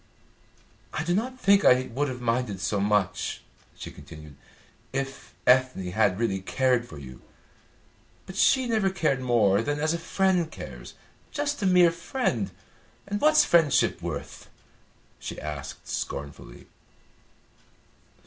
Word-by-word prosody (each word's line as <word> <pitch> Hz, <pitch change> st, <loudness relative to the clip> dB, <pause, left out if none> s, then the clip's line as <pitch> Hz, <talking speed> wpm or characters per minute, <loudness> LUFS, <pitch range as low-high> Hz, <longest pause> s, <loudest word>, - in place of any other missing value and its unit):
"I 160 Hz, -, -1 dB
do 175 Hz, +2 st, 0 dB
not 255 Hz, +6 st, -2 dB
think 200 Hz, -1 st, +4 dB
I 130 Hz, 0 st, +4 dB
would 145 Hz, +4 st, 0 dB
have 125 Hz, -2 st, -6 dB
minded 115 Hz, -4 st, -1 dB
so 100 Hz, +1 st, -1 dB
much," 105 Hz, -2 st, 0 dB, 0.3 s
she -, -, -8 dB
continued, 75 Hz, -2 st, -12 dB, 0.6 s
"if 135 Hz, 0 st, -5 dB
Ethne 125 Hz, -8 st, +3 dB
had 100 Hz, -2 st, +2 dB
really 105 Hz, -4 st, 0 dB
cared 125 Hz, +3 st, +1 dB
for 75 Hz, -, -11 dB
you; 65 Hz, -2 st, -11 dB, 1.0 s
but 190 Hz, -, -10 dB
she 260 Hz, +5 st, +4 dB
never 215 Hz, -4 st, +2 dB
cared 155 Hz, -8 st, 0 dB
more 115 Hz, -6 st, +3 dB
than 145 Hz, +4 st, -2 dB
as 155 Hz, +2 st, +1 dB
a 170 Hz, -, -2 dB
friend 180 Hz, -1 st, +1 dB
cares, -, -, -10 dB, 0.4 s
just 290 Hz, -3 st, -2 dB
a 195 Hz, -, +2 dB
mere 180 Hz, -2 st, +6 dB
friend. 170 Hz, +10 st, -2 dB, 0.6 s
And 205 Hz, +1 st, -3 dB
what's 305 Hz, 0 st, +5 dB
friendship 165 Hz, -5 st, +3 dB
worth?" -, -, -6 dB, 0.7 s
she -, -, -6 dB
asked 75 Hz, -2 st, -7 dB
scornfully. 70 Hz, -4 st, -6 dB
130 Hz, 130 wpm, -26 LUFS, -, 1.0 s, mere